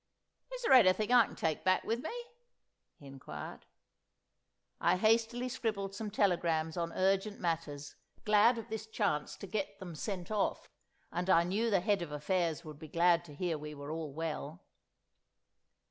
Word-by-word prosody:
"Is -, -, -6 dB
there 455 Hz, -, +4 dB
anything 215 Hz, -2 st, +5 dB
I 245 Hz, -3 st, +7 dB
can -, -, -12 dB
take 160 Hz, -2 st, -1 dB
back 185 Hz, 0 st, +3 dB
with 230 Hz, +2 st, -1 dB
me?" 315 Hz, -, -4 dB, 0.9 s
he 145 Hz, -, -16 dB
inquired. 130 Hz, -, -9 dB, 1.1 s
I 175 Hz, +1 st, +3 dB
hastily 230 Hz, +4 st, +2 dB
scribbled 215 Hz, -6 st, -2 dB
some 210 Hz, +1 st, -4 dB
telegrams 170 Hz, -6 st, +1 dB
on 170 Hz, -1 st, -2 dB
urgent 195 Hz, +2 st, +1 dB
matters, 160 Hz, -4 st, -3 dB, 0.3 s
glad 215 Hz, +3 st, +5 dB
of 230 Hz, -, -6 dB
this 220 Hz, 0 st, -5 dB
chance 200 Hz, -9 st, -1 dB
to -, -, -8 dB
get 200 Hz, 0 st, -3 dB
them 180 Hz, -3 st, -8 dB
sent 180 Hz, +3 st, -5 dB
off; 210 Hz, -2 st, -1 dB, 0.4 s
and 180 Hz, +2 st, -2 dB
I 170 Hz, -2 st, +6 dB
knew 205 Hz, +7 st, 0 dB
the 195 Hz, -4 st, +3 dB
Head 200 Hz, 0 st, +1 dB
of 170 Hz, -3 st, -5 dB
Affairs 165 Hz, +2 st, -1 dB
would 150 Hz, -2 st, -9 dB
be 155 Hz, -, -9 dB
glad 170 Hz, +2 st, +3 dB
to 150 Hz, -3 st, -12 dB
hear 165 Hz, -1 st, -2 dB
we 150 Hz, 0 st, -7 dB
were 145 Hz, +1 st, -7 dB
all 160 Hz, -2 st, -4 dB
well. 160 Hz, +2 st, -5 dB
185 Hz, 165 wpm, -33 LUFS, 160-215 Hz, 1.1 s, I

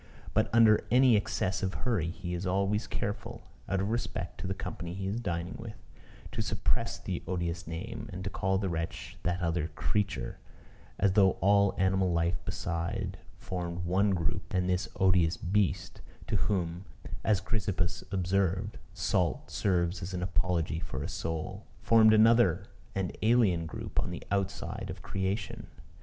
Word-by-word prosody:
But -, -, +3 dB
under 110 Hz, -2 st, +6 dB
any 125 Hz, 0 st, +6 dB
excess 95 Hz, -2 st, 0 dB
of 95 Hz, -1 st, -1 dB
hurry 100 Hz, -10 st, 0 dB
he 90 Hz, 0 st, -5 dB
is 90 Hz, +2 st, -2 dB
always 100 Hz, +4 st, +1 dB
careful, -, -, -4 dB, 0.3 s
out 95 Hz, -, +1 dB
of 100 Hz, +3 st, -1 dB
respect 120 Hz, +1 st, -3 dB
to -, -, -4 dB
the 95 Hz, -, -2 dB
company 85 Hz, -2 st, -5 dB
he 95 Hz, 0 st, -4 dB
is 100 Hz, +4 st, -1 dB
dining 90 Hz, -5 st, -2 dB
with, 115 Hz, -1 st, -7 dB, 0.6 s
to -, -, -2 dB
suppress -, -, -1 dB
the -, -, -4 dB
odious 85 Hz, -2 st, -2 dB
name, 110 Hz, +7 st, -5 dB
and 90 Hz, 0 st, -5 dB
to 100 Hz, -, -3 dB
call 95 Hz, +1 st, +1 dB
the 95 Hz, 0 st, -1 dB
wretch 85 Hz, -2 st, -4 dB
"that 90 Hz, 0 st, 0 dB
other 85 Hz, -2 st, 0 dB
creature," 85 Hz, -12 st, -2 dB, 0.6 s
as 100 Hz, -1 st, +3 dB
though 95 Hz, -2 st, +5 dB
all 100 Hz, 0 st, +3 dB
animal 95 Hz, 0 st, +2 dB
life 85 Hz, -1 st, 0 dB
beside 85 Hz, -1 st, -3 dB, 0.2 s
formed 90 Hz, -1 st, -4 dB
one 95 Hz, +4 st, +3 dB
group, 90 Hz, -1 st, -1 dB
and 90 Hz, 0 st, +2 dB
this 90 Hz, 0 st, 0 dB
odious 90 Hz, -3 st, +4 dB
beast 95 Hz, +3 st, 0 dB, 0.2 s
(to -, -, -1 dB
whom, 90 Hz, -2 st, 0 dB, 0.4 s
as 105 Hz, -4 st, +3 dB
Chrysippus 95 Hz, -4 st, -1 dB
observed, 95 Hz, +1 st, 0 dB, 0.2 s
salt 90 Hz, -1 st, 0 dB
serves 90 Hz, -2 st, +1 dB
as 90 Hz, +1 st, -4 dB
an 90 Hz, -, -2 dB
apology 85 Hz, -2 st, 0 dB
for 75 Hz, -4 st, -4 dB
a -, -, -2 dB
soul) 90 Hz, +5 st, -4 dB, 0.2 s
formed 110 Hz, -1 st, +7 dB
another 110 Hz, -4 st, +5 dB, 0.3 s
and 95 Hz, -2 st, -1 dB
alien 105 Hz, -8 st, +3 dB
group -, -, -4 dB
on -, -, -3 dB
the -, -, -6 dB
outside 100 Hz, -1 st, -2 dB
of -, -, -7 dB
creation. 95 Hz, +2 st, -2 dB
95 Hz, 160 wpm, -30 LUFS, 85-100 Hz, 0.6 s, formed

